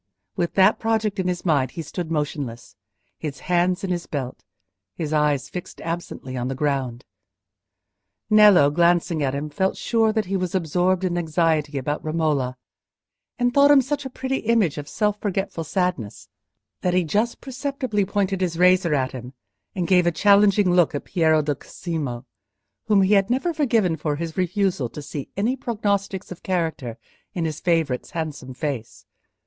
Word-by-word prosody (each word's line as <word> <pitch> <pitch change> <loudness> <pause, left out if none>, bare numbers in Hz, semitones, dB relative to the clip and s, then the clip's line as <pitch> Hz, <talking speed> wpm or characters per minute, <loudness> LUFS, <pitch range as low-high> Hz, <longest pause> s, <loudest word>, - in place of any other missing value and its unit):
With 170 - -2
that 195 +2 +5
project 220 -2 0
in 185 - 0
his 180 0 -2
mind 140 -6 +2
he 165 - -3
stood 175 0 -5
motionless—his 145 -1 -6
hands 180 +2 +1
in 190 - -2
his 175 -1 -3
belt, 130 -4 -5 0.5
his 155 -1 -3
eyes 150 -3 +1
fixed 180 0 -8
absently 165 -6 -5
on 125 0 -2
the 135 - -3
ground. 135 -4 -2 1.2
Nello, 210 -9 +6
glancing 170 0 +2
at 135 -1 0
him, 145 +2 -3
felt 190 +5 0
sure 225 -2 +2
that 215 -1 0
he 195 - -2
was 185 -1 -2
absorbed 180 +2 +1
in 175 -1 0
anxiety 155 -3 0
about 145 +3 -2
Romola, 150 -5 0 0.8
and 245 0 +1
thought 280 +1 +6
him 290 -1 +8
such 280 +2 -1
a 265 - -5
pretty 265 +1 -3
image 215 -10 +1
of 145 - -7
self 210 -1 0
forgetful 195 -4 -2
sadness, 135 - -2 0.5
that 180 -1 +1
he 185 - +3
just 210 +8 0
perceptibly 265 -5 -2
pointed 195 -1 -1
his 170 -3 -1
razor 180 -2 +4
at 130 -2 0
him, 125 0 -8 0.4
and 180 -3 -1
gave 180 -2 +4
a - - +4
challenging 200 +2 +4
look 175 -4 +3
at 145 - -4
Piero 160 -3 +2
di 145 0 0
Cosimo, 140 -5 -5 0.6
whom 205 -3 +4
he 190 +2 +3
had 195 +1 +3
never 270 +8 0
forgiven 230 - +2
for 150 -2 -2
his 165 +1 -5
refusal 185 - 0
to 150 - -8
see 140 -1 -6
any 225 +6 +1
prognostics 200 -7 -2
of 180 - -8
character 160 -10 -2 0.4
in 170 -2 -1
his 155 -1 -3
favourite's 160 -7 0
handsome 150 -6 -5
face. 135 -5 -5
175 Hz, 165 wpm, -23 LUFS, 150-200 Hz, 1.2 s, him